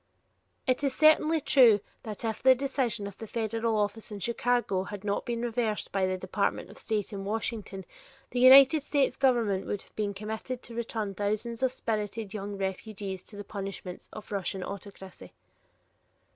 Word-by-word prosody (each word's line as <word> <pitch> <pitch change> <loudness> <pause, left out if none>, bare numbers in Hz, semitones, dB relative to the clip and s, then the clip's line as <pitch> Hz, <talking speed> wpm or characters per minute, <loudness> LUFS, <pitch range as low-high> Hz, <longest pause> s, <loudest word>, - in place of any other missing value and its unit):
It 255 +2 +1
is 275 -2 0
certainly 310 +1 +5
true 250 -8 +6 0.2
that 215 +1 -6
if 220 -1 -2
the 260 +1 +7
decision 255 -5 -1
of 200 -1 -8
the 225 - -7
federal 225 0 -1
office 210 +1 -2
in 205 - -6
Chicago 235 -4 0
had 205 -1 -7
not 205 +5 -2
been 235 -1 -2
reversed 225 -2 -1
by 190 -1 +1
the 185 0 -1
department 185 +2 -2
of - - -12
state 215 -1 -2
in 195 -1 -4
Washington, 205 -2 -3 0.5
the 250 - -1
United 270 +4 +8
States 285 -1 +1
government 235 -8 +2
would 205 - -3
have - - -27
been 205 -2 -2
committed 220 +4 -5
to 235 - -10
return 225 -3 -3
thousands 215 +4 -2
of 260 -1 +2
spirited 215 -4 -3
young 205 -1 -5
refugees 195 0 -4
to 210 - -14
the 205 - -6
punishments 195 -3 -6
of 215 - -9
the - - -8
Russian 190 -1 -2
autocracy. 195 -1 -9
215 Hz, 170 wpm, -29 LUFS, 200-240 Hz, 0.5 s, United